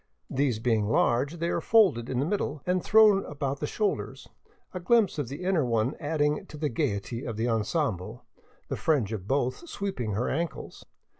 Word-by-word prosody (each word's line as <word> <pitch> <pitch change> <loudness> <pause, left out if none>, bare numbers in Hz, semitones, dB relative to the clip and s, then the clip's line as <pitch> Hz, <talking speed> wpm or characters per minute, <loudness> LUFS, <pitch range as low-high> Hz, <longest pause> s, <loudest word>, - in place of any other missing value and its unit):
These 135 -4 +1
being 110 -2 +1
large, 125 +7 +2
they 170 +1 -1
are 170 - -1
folded 180 - +3
in 125 - -1
the 140 - +1
middle 155 -6 -2
and 180 0 0
thrown 215 -2 +6
about 140 -2 -3
the 150 - -2
shoulders, 210 +5 -2 0.5
a 185 - -4
glimpse 200 -2 +2
of 145 - -2
the 140 +8 -7
inner 180 -4 +2
one 115 +2 0
adding 150 -1 0
to 150 - -10
the 150 0 -1
gaiety 115 +2 -2
of 115 -3 -5
the 115 +2 0
ensemble, 110 - -2 0.4
the - - -3
fringe 130 -10 +1
of 100 -3 -6
both 135 - -1
sweeping 130 - -3
her 115 +5 -1
ankles. 165 +3 -4
140 Hz, 180 wpm, -27 LUFS, 115-170 Hz, 0.5 s, thrown